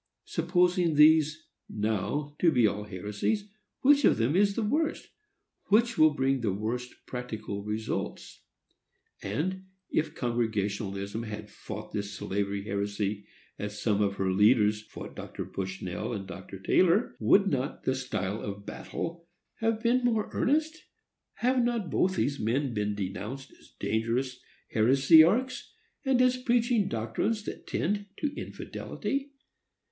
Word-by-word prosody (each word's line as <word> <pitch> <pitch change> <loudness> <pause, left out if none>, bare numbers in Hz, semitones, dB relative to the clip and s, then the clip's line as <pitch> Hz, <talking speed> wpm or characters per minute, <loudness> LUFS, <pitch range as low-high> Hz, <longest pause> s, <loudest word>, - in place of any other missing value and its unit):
Supposing 175 -1 +2
these, 155 0 +5 0.2
now, 110 +8 -2
to 170 - +5
be 125 -6 +4
all 105 0 0
heresies, 105 - -2 0.3
which 285 +1 +5
of - - +5
them 120 +7 +1
is 200 +1 +3
the 230 - 0
worst?—which 240 - -1
will 155 -1 +5
bring 135 -1 +1
the 110 -4 +1
worst 115 +5 -4
practical 110 -5 -5
results? 110 +1 -4 0.8
And, 185 - -2 0.3
if 155 0 0
Congregationalism 105 -3 -2
had 105 -2 -7
fought - - -8
this 100 0 -3
slavery 100 0 -2
heresy 100 0 -2 0.3
as 105 0 -5
some 105 -2 +1
of 100 -1 +1
her 95 -1 0
leaders 105 +1 +4
fought - - -10
Dr. - - -6
Bushnell 95 +3 -4
and 100 -3 -4
Dr. 95 +1 -8
Taylor, 180 - +3
would 200 - +5
not 140 -6 -2
the 130 - +1
style 110 -6 -3
of 100 0 -6
battle 170 0 -6 0.3
have 225 0 0
been 245 +2 +3
more 225 -3 +1
earnest? 315 +4 +1 0.5
Have 250 0 +2
not 235 -6 -1
both 185 0 +2
these 145 -5 0
men 125 +4 0
been 105 -1 -1
denounced 105 +7 -5
as - - -21
dangerous 120 +4 -1 0.3
heresiarchs, 160 - +5 0.3
and 265 -3 +2
as 255 0 +3
preaching 240 -4 +2
doctrines 115 - -1
that - - -7
tend 205 +3 -1
to 295 -1 -2
infidelity? 275 +1 -4
130 Hz, 130 wpm, -29 LUFS, -, 0.8 s, these